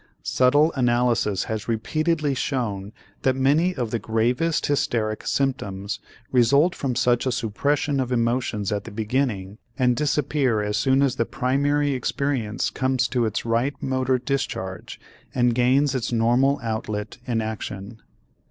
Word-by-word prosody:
Subtle 145 +5 +3
analysis 120 -5 +1
has 110 -2 -4
repeatedly 155 +6 0
shown 110 -7 -2 0.3
that 130 -1 +2
many 150 +7 +2
of 120 -4 -3
the 115 - -1
gravest 120 +9 0
hysteric 115 -6 -1
symptoms 100 -8 -1 0.3
result 140 +7 +4
from 130 -3 -2
such 120 +2 +2
a - - +2
suppression 140 +5 0
of 130 -1 -1
emotions 115 -4 0
at 105 -1 -2
the - - -7
beginning 110 -2 -2 0.2
and 125 -2 +3
disappear 145 -4 +1
as 105 0 -1
soon 130 +5 +3
as 135 -2 +1
the 115 - +1
primary 145 +3 +1
experience 130 -3 -1
comes 130 -1 +1
to 120 -3 +1
its 110 - -3
right 120 +5 0
motor 130 -1 0
discharge 120 -9 -4 0.4
and 120 -1 +3
gains 130 +4 +3
its 125 -3 -2
normal 120 +5 +3
outlet 110 0 -4
in 120 -2 0
action. 110 0 -5
125 Hz, 140 wpm, -24 LUFS, 110-135 Hz, 0.4 s, result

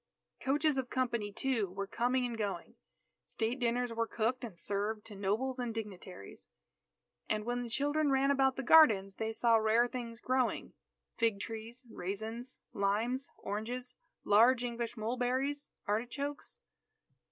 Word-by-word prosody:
Coaches 290 +1 +2
of 255 -2 -3
company, 235 -5 -1
too, 225 -3 0
were 195 +2 -4
coming 250 +5 +1
and 240 -1 -3
going. 210 -3 -3 0.5
State 230 +3 -2
dinners 245 0 0
were 230 0 0
cooked 235 +4 -1
and 215 -8 -6
served 205 +3 -2
to 210 - -9
nobles 220 +7 -1
and 240 -2 -2
dignitaries. 190 - -8 0.8
And 215 0 0
when 245 +1 -1
the 240 - -5
children 290 +4 +1
ran 270 +1 +3
about 265 -1 +3
the 270 - -3
gardens, 215 -10 +6
they 220 0 -1
saw 230 +1 +4
rare 220 +2 +4
things 235 -2 -6
growing 255 0 0 0.5
"fig 225 -4 +2
trees, 225 +4 -7
raisins, 220 +5 -5
limes, 220 +7 0
oranges, 245 +5 -4 0.3
large 235 +4 +5
English 235 -1 -3
mulberries, 255 +5 -1 0.2
artichokes." 245 +7 -3
235 Hz, 140 wpm, -33 LUFS, 215-255 Hz, 0.8 s, gardens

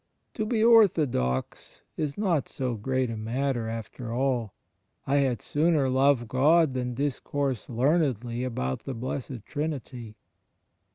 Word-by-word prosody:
To 215 -1 -2
be 220 -1 +1
'orthodox' 155 - +2
is 150 -3 -3
not 180 -9 0
so 130 -3 -2
great 130 +2 -1
a - - -4
matter 120 +2 -2
after 115 +1 -6
all: 120 -4 -1 0.5
*I 140 +1 +2
had 130 -6 +1
sooner 150 -3 +2
love 130 -2 +3
God 150 +5 +4
than 125 -1 -3
discourse 140 -2 -2
learnedly 125 -3 +1
about 65 - -3
the 135 - -4
Blessed 125 -1 -5
Trinity.' 130 -7 -5
130 Hz, 125 wpm, -27 LUFS, 115-145 Hz, 0.5 s, God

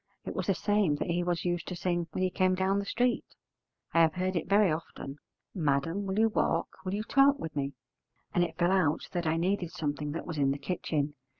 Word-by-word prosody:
It - - -4
was - - -3
the 195 - +3
same 200 -2 +2
that 160 - -2
he 175 +1 +1
was 175 -1 -1
used 175 -1 -1
to 180 - -4
sing 175 -1 -1
when 185 - -1
he 185 - +1
came 185 0 +2
down 190 +2 +1
the 200 - -3
street; 245 +3 0 0.6
I 165 - +5
have 160 0 +4
heard 185 +1 -1
it 170 +1 -2
very 200 -3 +5
often: 155 -3 -5 0.4
'Madam, 165 +4 0
will 190 +1 -2
you 225 +1 +4
walk, - - +1
will 190 +1 -2
you 210 - -2
talk 275 +4 +4
with 160 - -6
me?' 140 -1 -2 0.6
And 175 - +3
it 165 -2 -4
fell 175 +1 +3
out 170 -6 +2
that 175 -2 -2
I 160 +1 +2
needed 180 0 0
something 150 -3 -3
that 165 - -4
was 160 -4 -4
in 140 -1 +3
the 135 - 0
kitchen. 150 -1 -2
175 Hz, 230 wpm, -30 LUFS, 155-190 Hz, 0.6 s, I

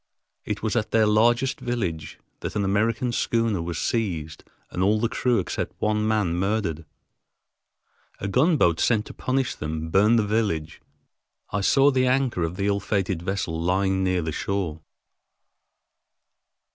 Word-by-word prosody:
It - - -4
was 110 0 -1
at 110 -2 0
their 110 0 +3
largest 120 +5 +2
village 95 -11 -3 0.2
that - - -5
an 100 -1 0
American 110 +5 +1
schooner 115 -5 0
was 85 -1 -4
seized 85 -10 -2 0.3
and 90 - -3
all 105 +3 +3
the 115 - +1
crew 125 +1 +1
except 95 - -3
one 105 0 +1
man 105 -6 +1
murdered. 95 -4 -1 1.3
A 100 - -3
gunboat 125 - +3
sent 110 -3 +2
to - - -10
punish 130 0 -1
them 80 +1 -5
burned 105 +6 +4
the 110 - +2
village. 100 -8 -1 0.7
I 100 - -1
saw 135 +7 +4
the 130 -1 +2
anchor 130 -6 +1
of 85 +1 -1
the 100 - -1
ill 100 0 +1
fated 95 -3 -1
vessel 90 -3 -2
lying 95 +2 +1
near 90 -2 +1
the 80 - -2
shore. 85 -2 -3
100 Hz, 150 wpm, -24 LUFS, 90-115 Hz, 1.3 s, burned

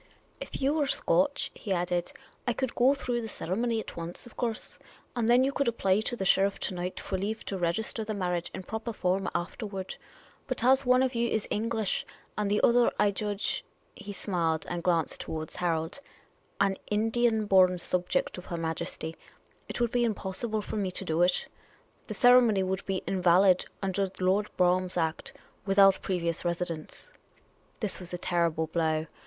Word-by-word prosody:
" - - -35
If - - -6
you 275 +2 +3
were 300 -3 +1
Scotch," 280 +1 +1
he 205 - -7
added, 175 -1 0 0.2
" - - -34
I 240 - +2
could 260 +1 -2
go 260 +3 +4
through 245 -3 -2
the 225 - -5
ceremony 225 +4 -1
at - - -7
once, 170 +5 -7
of 240 - -14
course; 230 -3 -4 0.4
and 235 -2 +1
then 245 +2 +6
you 270 - +2
could 280 -1 0
apply 200 -4 +2
to 225 +3 -2
the 195 - -3
sheriff 195 +1 +3
to - - -1
night 180 +1 -4
for 190 - -3
leave 215 +3 -3
to 195 - -3
register 185 +6 -1
the 215 0 -4
marriage 180 -3 -1
in 190 - -7
proper 220 +4 -4
form 190 -1 0
afterward; 195 +1 -4 0.5
but 255 -3 -3
as 260 +1 +4
one 255 +1 +5
of 260 0 0
you 235 0 +1
is 220 - -1
English, 220 -1 0 0.3
and 210 -1 -1
the 210 - +2
other, 240 0 +5
I 205 - +3
judge 205 +1 -2
" - - -39
— - - -38
he 205 - -8
smiled 170 -5 -1
and 175 -1 -3
glanced 170 -2 0
towards 155 -1 -6
Harold 165 +7 -1 0.2
— - - -35
" - - -38
an 195 -1 +2
Indian 220 +1 +2
born 185 -2 +5
subject 180 +1 -1
of 180 - -11
Her 170 - -4
Majesty, 160 0 -3 0.5
it - - -4
would 240 -1 +1
be 245 -1 +2
impossible 215 0 -2
for - - -4
me 195 -3 0
to 190 +1 -2
do 160 0 0
it: 180 0 +3 0.6
the - - -5
ceremony 245 -5 +6
would 190 +1 -2
be 190 -2 -1
invalid, 185 0 +4 0.2
under 195 +1 0
Lord 190 +3 +2
Brougham's 180 0 +2
Act, 160 -1 -1 0.3
without 195 0 +6
previous 170 -3 -1
residence. 170 - -4 0.2
' - - -34
' - - -35
This 210 -4 -2
was 180 -1 -9
a 180 - -3
terrible 170 -2 0
blow. 160 -1 0
195 Hz, 195 wpm, -29 LUFS, 180-225 Hz, 0.6 s, then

